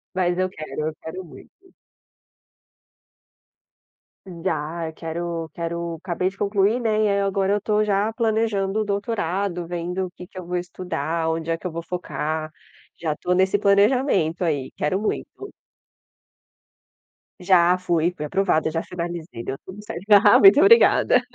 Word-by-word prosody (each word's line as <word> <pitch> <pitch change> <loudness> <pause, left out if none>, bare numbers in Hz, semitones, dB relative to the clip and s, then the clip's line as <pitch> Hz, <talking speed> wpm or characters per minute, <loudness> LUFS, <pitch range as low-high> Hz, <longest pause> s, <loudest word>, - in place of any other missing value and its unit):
Mas 180 -1 +1
eu 185 0 0
quero, 155 -3 -5
eu 160 - -10
quero 170 +4 -7
muito. 170 - -14 2.8
Dá, 165 -1 -3
eu - - -11
quero 165 0 -4
quero, 170 0 -4
acabei 180 0 -1
de 190 +1 -5
concluir, 205 +4 +1
né, 230 - 0 0.2
e - - +3
aí 200 0 +1
agora 195 0 +1
eu 205 - 0
tô 210 +1 +1
já 205 +1 +1
planejando 220 -3 0
o - - +1
doutorado, 200 -3 -2
vendo 175 +2 -3
o - - -15
que 180 0 -12
que 185 - -16
eu 185 - -6
vou 180 +1 -2
estudar, 175 -2 -3
onde 160 0 -3
é 165 - 0
que 165 - -18
eu 180 - -2
vou 165 +1 -5
focar. 155 -3 -4 0.5
Já 155 -3 -2
tô 180 - -4
nesse 190 +2 +3
planejamento 200 - +2
aí, 145 -6 -1
quero 170 +6 -1
muito. 400 - -4 1.9
Já 180 -1 +4
fui, 175 -2 0
fui 150 - -5
aprovada, 160 -2 +1
já 165 +1 -1
finalizei, 170 -8 -6
deu 135 - -4
tudo 190 +2 -11
certo 200 +1 -8
Aham, 205 0 +7
muito 195 +7 +8
obrigada. 455 +8 +5
180 Hz, 155 wpm, -23 LUFS, 165-200 Hz, 2.8 s, muito